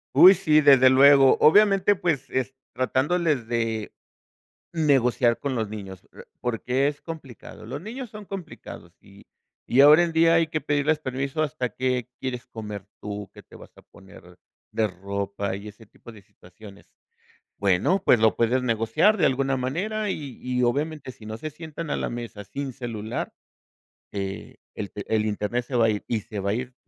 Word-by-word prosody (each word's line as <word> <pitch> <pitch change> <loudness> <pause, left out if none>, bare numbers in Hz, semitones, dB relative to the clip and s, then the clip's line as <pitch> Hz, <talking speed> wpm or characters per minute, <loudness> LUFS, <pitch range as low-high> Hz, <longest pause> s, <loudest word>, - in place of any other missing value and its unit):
Uy, 185 +2 +10
sí, 155 -6 +3
desde 135 -3 +7
luego. 135 0 +6
Obviamente, 200 +3 +5
pues, 150 -7 -2
es 130 0 -2 0.2
tratándoles 135 +1 0
de 115 -2 -2 0.8
negociar 125 -6 +2
con 140 -2 -3
los 110 -3 -2
niños, 95 -4 -8
pr - - -14
porque, 125 +3 0
es 145 0 -4
complicado. 145 -10 -10
Los 140 +5 -6
niños 240 +4 -7
son 210 -2 -10
complicados, 165 - -9
y 100 +1 -18 0.5
y 130 +3 +6
ahora 150 +4 +8
en 170 -1 0
día, 165 0 +4
hay 165 -1 +3
que 155 0 -3
pedirles 145 +1 +1
permiso 140 +2 -3
hasta 125 -4 -3
qué 125 -1 -2
quieres 130 -1 -5
comer 105 -3 -8
tú, 105 -1 -6
que - - -15
te - - -18
vas - - -14
a - - -17
poner 90 -2 -17 0.3
de 110 -1 +1
ropa 100 +1 -4
y 100 +2 -9
ese 105 +2 -13
tipo 120 - -15
de 105 -3 -15
situaciones. 100 +2 -16 0.7
Bueno, 100 - +1
pues, 115 - +5
lo 110 -1 +3
puedes 120 +2 +1
negociar 115 - +2
de - - +1
alguna 135 0 +1
manera, 195 +11 -2
y 140 -8 -6
y, 125 0 -1
obviamente, 145 +2 -2
si 110 - -16
no 110 +1 -7
se 155 - -5
sientan 160 +1 -8
a - - -1
la - - -3
mesa 115 -4 -7
sin 135 +2 -6
celular, 115 -4 -5 0.8
eh, 100 -1 -6 0.2
el 100 - -6
te 100 - -7
el 110 0 +1
Internet 105 +4 -2
se 130 - -5
va 115 -2 +4
ir, 105 - -4
y 110 -3 -1
se 105 -2 -7
va 100 +1 -2
a - - +1
ir, 125 +1 -5
125 Hz, 180 wpm, -24 LUFS, 110-150 Hz, 0.8 s, Uy